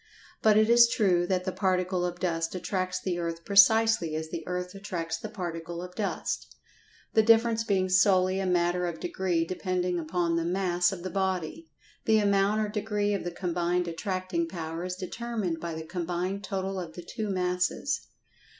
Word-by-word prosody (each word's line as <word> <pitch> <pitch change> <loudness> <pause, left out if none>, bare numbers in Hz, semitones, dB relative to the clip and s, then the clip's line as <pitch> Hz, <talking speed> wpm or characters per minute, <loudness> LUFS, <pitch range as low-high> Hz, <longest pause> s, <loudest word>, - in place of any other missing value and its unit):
But 215 -1 +5
it 215 0 +5
is 235 0 +7
true 180 -6 +2
that 185 -1 0
the 185 - -2
particle 185 -1 0
of 175 0 -6
dust 165 -1 -1
attracts 185 0 -2
the 180 -2 -2
earth 165 -1 -4
precisely 200 -4 +5
as 160 0 -4
the 165 - -5
earth 180 0 -3
attracts 180 -5 -4
the - - -6
particle 170 -3 -5
of 180 0 -9
dust—the 215 +2 -3
difference 225 0 +4
being 195 -4 +1
solely 185 0 +4
a 190 - -1
matter 175 0 +1
of 165 -2 -5
degree 175 -2 -1
depending 180 0 -1
upon 170 +1 0
the 165 - 0
"mass" 175 0 +1
of 180 -3 -6
the 185 - -4
body. 180 -4 -2 0.4
The 220 0 +4
amount 200 0 +2
or 215 - 0
degree 210 -1 -1
of 200 - -2
the 175 - -2
combined 175 0 -1
attracting 180 0 -2
power 165 -1 -5
is 180 0 -3
determined 195 -2 -3
by 170 -1 -4
the 160 0 -6
combined 180 +3 -3
total 195 0 -3
of 170 -3 -6
the 175 - -8
two 215 +4 -4
masses. 180 +8 -1
185 Hz, 175 wpm, -28 LUFS, 175-195 Hz, 0.4 s, is